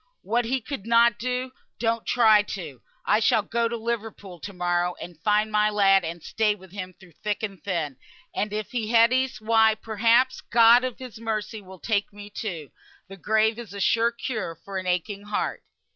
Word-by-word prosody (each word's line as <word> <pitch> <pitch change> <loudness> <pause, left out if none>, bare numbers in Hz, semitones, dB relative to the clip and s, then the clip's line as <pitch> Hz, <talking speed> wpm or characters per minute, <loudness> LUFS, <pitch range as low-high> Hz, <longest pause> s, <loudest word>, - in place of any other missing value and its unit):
What 235 +2 0
he 260 +2 -1
could 225 -3 -7
na 235 0 +6
do, 250 +3 -3 0.3
don't 230 -1 -1
you - - +1
try. 220 -3 +6 0.6
I - - +3
shall 225 -1 +3
go 230 +2 0
to 235 0 -3
Liverpool 220 -5 -5
to 200 - -7
morrow, 175 -1 0
and 175 -3 -9
find 210 +3 +2
my 210 0 +3
lad, 195 -2 +4
and 165 0 -6
stay 215 -2 +1
with 190 -2 -16
him 185 -2 -7
through 190 -2 -17
thick 210 +6 -4
and 195 -4 -5
thin; 160 -9 -2 0.4
and 205 +1 -2
if 215 0 -4
he 230 -3 -2
dies, 240 +1 +3
why, 220 0 +4
perhaps, 230 +4 +2
God 235 +1 +5
of 255 -2 -3
His 250 -4 -10
mercy 220 -1 -3
will 190 -1 -13
take 205 +2 -1
me 205 0 -11
too. 175 - -6 0.4
The 195 - -10
grave 220 +3 +1
is 210 -5 -9
a - - -6
sure 230 +4 +3
cure 225 -8 -4
for 190 +4 -6
an 185 - -7
aching 195 +3 -2
heart." 210 0 -2
215 Hz, 190 wpm, -25 LUFS, 195-230 Hz, 0.6 s, na